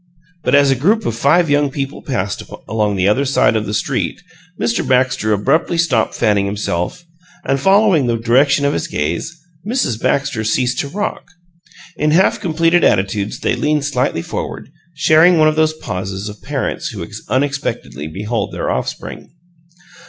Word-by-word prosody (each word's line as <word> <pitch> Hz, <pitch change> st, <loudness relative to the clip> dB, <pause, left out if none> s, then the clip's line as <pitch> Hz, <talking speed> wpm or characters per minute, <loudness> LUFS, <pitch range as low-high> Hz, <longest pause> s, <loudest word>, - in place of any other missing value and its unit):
But -, -, +3 dB
as 140 Hz, -1 st, +5 dB
a -, -, +3 dB
group 205 Hz, -, +1 dB
of -, -, -1 dB
five 165 Hz, +8 st, +3 dB
young 145 Hz, -1 st, +2 dB
people 135 Hz, +1 st, -5 dB
passed 100 Hz, -7 st, -3 dB, 0.3 s
along 105 Hz, -2 st, 0 dB
the 95 Hz, 0 st, +1 dB
other 105 Hz, +7 st, +2 dB
side 135 Hz, -4 st, +2 dB
of 110 Hz, -1 st, -1 dB
the 105 Hz, -, -3 dB
street 135 Hz, +3 st, -2 dB, 0.4 s
Mr. 115 Hz, +2 st, 0 dB
Baxter 125 Hz, -4 st, +1 dB
abruptly 155 Hz, -, +1 dB
stopped 135 Hz, -10 st, +1 dB
fanning 105 Hz, -3 st, +1 dB
himself, 100 Hz, -, -3 dB, 0.4 s
and, 135 Hz, 0 st, +1 dB
following 195 Hz, -, +4 dB
the 115 Hz, -1 st, +1 dB
direction 135 Hz, +5 st, +3 dB
of 140 Hz, -, +2 dB
his 85 Hz, -, -2 dB
gaze, 85 Hz, -, -3 dB, 0.2 s
Mrs. 210 Hz, -, -1 dB
Baxter 135 Hz, -5 st, 0 dB
ceased 125 Hz, +3 st, 0 dB
to 145 Hz, -, -1 dB
rock. 205 Hz, +8 st, -4 dB, 0.7 s
In 150 Hz, -, +1 dB
half 170 Hz, +5 st, +3 dB
completed 165 Hz, +1 st, +2 dB
attitudes 100 Hz, +1 st, 0 dB
they -, -, +1 dB
leaned 150 Hz, -1 st, 0 dB
slightly 125 Hz, -, -1 dB
forward, -, -, -6 dB, 0.2 s
sharing 160 Hz, +4 st, +5 dB
one 155 Hz, -1 st, +5 dB
of 155 Hz, -, +2 dB
those 155 Hz, 0 st, +2 dB
pauses 95 Hz, -5 st, -5 dB
of 105 Hz, -1 st, -11 dB
parents -, -, -3 dB
who -, -, -6 dB, 0.2 s
unexpectedly 135 Hz, -, -2 dB
behold 105 Hz, +8 st, -3 dB
their -, -, -2 dB
offspring. -, -, -5 dB
135 Hz, 160 wpm, -17 LUFS, 105-155 Hz, 0.7 s, as